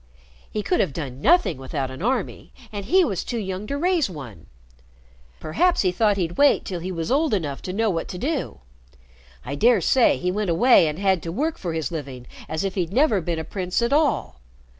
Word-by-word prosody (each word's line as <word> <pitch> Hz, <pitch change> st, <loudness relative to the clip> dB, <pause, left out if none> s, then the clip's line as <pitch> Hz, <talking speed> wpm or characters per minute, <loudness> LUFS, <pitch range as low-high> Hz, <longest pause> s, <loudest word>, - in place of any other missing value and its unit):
He 210 Hz, -, -3 dB
could 360 Hz, -, 0 dB
have 155 Hz, -, +1 dB
done 135 Hz, -4 st, -6 dB
nothing 335 Hz, -, +3 dB
without 135 Hz, 0 st, -4 dB
an 130 Hz, -, -9 dB
army, 240 Hz, 0 st, -2 dB, 0.2 s
and 205 Hz, -2 st, -5 dB
he 370 Hz, -, +4 dB
was 195 Hz, -, -2 dB
too 240 Hz, -, -4 dB
young 190 Hz, -1 st, -4 dB
to 280 Hz, -, -2 dB
raise 345 Hz, -, +1 dB
one. 130 Hz, -, -10 dB, 0.9 s
Perhaps 350 Hz, -, +1 dB
he 185 Hz, -, +2 dB
thought 205 Hz, +1 st, +2 dB
he'd 175 Hz, -2 st, -3 dB
wait 285 Hz, 0 st, +4 dB
till 180 Hz, -3 st, -4 dB
he 180 Hz, +3 st, -5 dB
was 165 Hz, +3 st, -3 dB
old 290 Hz, -2 st, +2 dB
enough 145 Hz, -7 st, -3 dB
to 185 Hz, -, -5 dB
know 220 Hz, +2 st, +1 dB
what 165 Hz, -2 st, -3 dB
to 180 Hz, -, -6 dB
do. 280 Hz, -, -3 dB, 0.8 s
I 140 Hz, -, -4 dB
dare 225 Hz, +9 st, +4 dB
say 240 Hz, +8 st, +3 dB
he 180 Hz, 0 st, -1 dB
went 205 Hz, 0 st, -2 dB
away 170 Hz, +1 st, +5 dB
and 150 Hz, 0 st, -3 dB
had 190 Hz, -2 st, +1 dB
to 165 Hz, -, -5 dB
work 305 Hz, -, -2 dB
for 170 Hz, -3 st, -3 dB
his 160 Hz, +1 st, -3 dB
living 135 Hz, -6 st, -6 dB, 0.2 s
as 160 Hz, +2 st, -2 dB
if 195 Hz, -1 st, -2 dB
he'd 180 Hz, -3 st, -2 dB
never 230 Hz, -4 st, +3 dB
been 170 Hz, 0 st, -3 dB
a 160 Hz, -, -3 dB
prince 180 Hz, +1 st, -2 dB
at 235 Hz, -, +1 dB
all. 285 Hz, -, +1 dB
190 Hz, 215 wpm, -23 LUFS, 160-245 Hz, 0.9 s, away